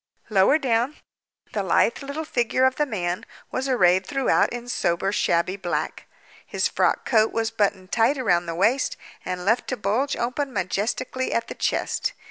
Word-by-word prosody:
Lower 195 +8 +5
down, 255 0 0 0.6
the 210 - 0
lithe 195 +7 +2
little 280 +3 -5
figure 250 -1 +1
of 260 0 +2
the 295 - +1
man 180 -6 -2 0.3
was 265 +1 -2
arrayed 185 -7 +4
throughout 275 -2 +2
in 245 0 -6
sober 195 -4 0
shabby 185 -1 +1
black. 180 -3 -3 0.4
His - - 0
frock - - +1
coat 220 -3 +3
was 225 -1 -1
buttoned 195 -4 -1
tight 235 +5 +3
round 175 -9 +1
the 165 - -3
waist, 225 +9 +1 0.3
and 180 0 -4
left 225 +4 +2
to 255 - -2
bulge 225 +8 0
open 260 +4 -2
majestically 215 +6 -2
at 230 - -1
the - - -4
chest. - - -1
225 Hz, 165 wpm, -24 LUFS, 190-260 Hz, 0.6 s, Lower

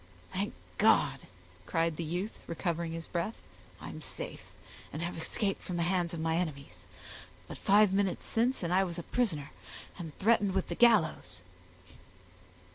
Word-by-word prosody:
"Thank - - -2 0.2
God!" - - +4 0.5
cried 165 -1 +1
the 170 - -3
youth, 180 +7 -3
recovering 170 -1 -2
his 165 0 -5
breath, 175 +6 -2 0.4
"I - - -7
am - - -8
safe, - - -6 0.5
and 155 - -4
have 175 - -3
escaped 195 +4 -1
from 180 - -4
the 170 - +1
hands 175 -1 +1
of 170 - -4
my 160 0 +1
enemies; 140 - -4 0.6
but - - -8
five 205 0 +5
minutes 195 -2 +1
since 235 0 +1
and 170 +1 0
I 190 +1 +5
was 175 -2 -4
a 170 - -4
prisoner, 160 - 0 0.5
and 165 -4 -7
threatened 205 -2 +3
with 190 - 0
the 170 - -2
gallows." 165 - +3
170 Hz, 160 wpm, -31 LUFS, 165-195 Hz, 0.6 s, five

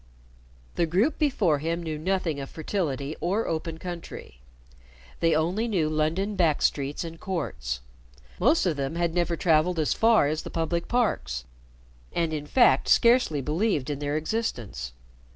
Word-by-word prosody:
The 170 - +2
group 205 - +1
before 205 - +2
him 165 +3 -2
knew 155 -2 -4
nothing 175 -3 -1
of 135 - -6
fertility 155 -4 -3
or 195 +6 0
open 160 0 -3
country. 170 - -8 0.8
They 165 -1 +3
only 180 +9 0
knew 180 -9 +1
London 160 +7 0
back 165 -6 +2
streets 140 +2 0
and 165 -1 -8
courts. 75 - -3 0.6
Most 295 +2 +3
of 165 -5 0
them 140 +3 -2
had 170 -1 0
never 175 -1 0
traveled 165 +1 +2
as 155 -2 +1
far 225 -9 +4
as 155 +1 -1
the - - -8
public 170 +1 -2
parks, 65 - 0 0.7
and 165 -2 0
in 150 -1 -4
fact 255 - +4
scarcely 235 - +4
believed 150 - 0
in 140 - -4
their 145 +1 -1
existence. 120 - -3
165 Hz, 150 wpm, -26 LUFS, 150-185 Hz, 0.8 s, far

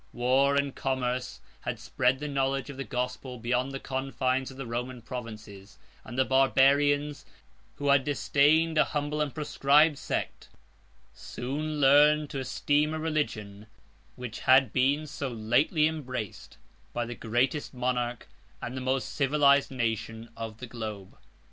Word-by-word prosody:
War 130 +3 +2
and 140 -1 0
commerce 130 -1 -2 0.2
had - - -4
spread 130 +1 +1
the 150 +2 -5
knowledge 135 0 -1
of 135 - -11
the 135 - -3
gospel 125 0 -4
beyond 125 +3 -1
the 135 - -5
confines 130 -1 -1
of 135 - -12
the 135 - -5
Roman 120 +2 -4
provinces; 110 -5 -9 0.3
and 120 - -9
the 130 - +3
Barbarians, 140 +2 +3 0.5
who 145 0 -2
had 140 -1 +5
disdained 155 +3 +2
as - - +4
humble 150 0 -2
and 150 -2 -1
proscribed 150 0 +3
sect, - - -4 0.6
soon 150 +5 -4
learned 145 +2 +5
to 140 - -3
esteem 145 +3 0
a - - -3
religion 110 -10 -3 0.5
which 125 -3 -7
had 130 -3 +4
been 140 +4 +2
so 140 -1 -5
lately 120 +7 +2
embraced 130 -9 -6 0.4
by 120 - -1
the 120 - -6
greatest 120 +6 -1
monarch, 125 -1 -2 0.3
and 125 - -6
the 130 - -4
most 130 0 -1
civilized 140 0 +3
nation, 115 -2 -3
of 110 -1 -6
the 125 - -7
globe. 110 -5 -7
130 Hz, 145 wpm, -28 LUFS, 125-145 Hz, 0.6 s, had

